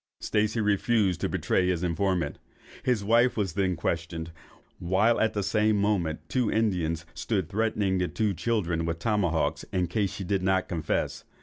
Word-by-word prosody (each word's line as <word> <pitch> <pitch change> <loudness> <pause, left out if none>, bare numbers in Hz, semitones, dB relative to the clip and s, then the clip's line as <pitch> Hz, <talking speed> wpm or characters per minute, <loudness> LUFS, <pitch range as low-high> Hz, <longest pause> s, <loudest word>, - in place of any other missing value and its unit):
Stacey 110 +2 0
refused 105 -2 +2
to - - 0
betray 90 - +1
his 90 -1 0
informant. 90 +1 0 0.4
His 120 -5 +1
wife 115 +4 +3
was 95 -6 -1
then 95 0 +1
questioned, 80 0 -3 0.5
while 95 +7 +2
at 110 - +2
the 105 - -1
same 105 +2 +2
moment 95 -6 0
two 125 -4 0
Indians 90 -7 0
stood 95 -8 -2
threatening 105 -3 0
the 90 - +1
two 105 0 0
children 85 -3 -1
with 85 0 -2
tomahawks 85 -7 0
in 90 -2 +1
case 100 +2 -1
she 100 - -6
did 95 0 0
not 95 0 +1
confess. 80 -3 -2
95 Hz, 165 wpm, -27 LUFS, 85-105 Hz, 0.5 s, wife